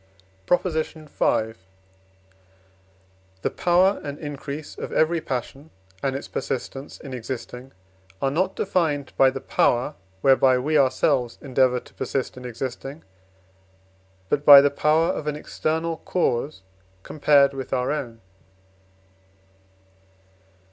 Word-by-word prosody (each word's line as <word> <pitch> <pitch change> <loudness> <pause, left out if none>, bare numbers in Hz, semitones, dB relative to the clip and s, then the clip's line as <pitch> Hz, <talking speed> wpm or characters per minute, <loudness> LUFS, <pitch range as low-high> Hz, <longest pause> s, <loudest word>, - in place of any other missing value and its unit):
PROP. 180 - +3
V. 155 -9 -1 1.9
The - - +1
power 180 +3 +3
and 145 0 -5
increase 145 0 -7
of - - -6
every 160 +1 +2
passion, 135 +4 -5 0.3
and 135 -1 -1
its 140 - -5
persistence 135 +2 -5
in 135 -3 -9
existing 125 +1 -7 0.5
are 135 - 0
not 185 +6 0
defined 160 -8 -1
by 135 - +5
the 135 +1 -5
power, 125 +2 +1 0.3
whereby 130 0 +5
we 150 +5 -1
ourselves 130 -3 +2
endeavour 130 -2 +2
to - - -19
persist 135 -1 -3
in 125 0 -10
existing, 130 +4 -6 1.2
but 145 +8 0
by 145 -1 +11
the 140 0 +3
power 155 +3 +2
of 150 - -3
an 150 - -1
external 160 +2 -2
cause 140 - -1 0.4
compared 140 -2 +3
with 135 -1 -6
our 125 0 0
own. 120 -6 -4
140 Hz, 115 wpm, -24 LUFS, 130-155 Hz, 1.9 s, by